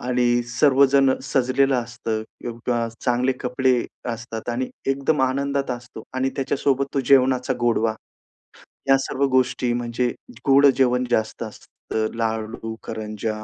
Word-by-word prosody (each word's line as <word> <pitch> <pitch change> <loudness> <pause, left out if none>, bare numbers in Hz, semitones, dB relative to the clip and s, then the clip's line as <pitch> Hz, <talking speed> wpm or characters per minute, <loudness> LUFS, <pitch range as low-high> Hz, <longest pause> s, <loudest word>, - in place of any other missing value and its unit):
आणि 120 -1 +1
सर्वजण 135 +1 +4
सजलेलं 135 +1 +2
असतं 120 -2 -3 0.2
किंवा 120 0 -2
चांगले 125 +1 +1
कपडे 130 +1 +1 0.4
असतात 115 0 -7
आणि 125 +2 -2 0.2
एकदम 140 +2 +1
आनंदात 140 +1 0
असतो 120 -2 -7
आणि 130 +1 0
त्याच्यासोबत 135 0 0
तो 140 - +2
जेवणाचा 130 -1 +4
गोडवा. 115 -2 +2 1.0
ह्या 135 0 +6
सर्व 135 +1 -2
गोष्टी 125 -1 +2
म्हणजे 120 +1 -1 0.4
गोड 140 +1 +6
जेवण 125 -1 +3
जास्त 110 0 0
असतं 110 0 -5
लाडू, 110 0 -3
करंज्या, 110 0 -4
125 Hz, 120 wpm, -23 LUFS, 115-135 Hz, 1.0 s, ह्या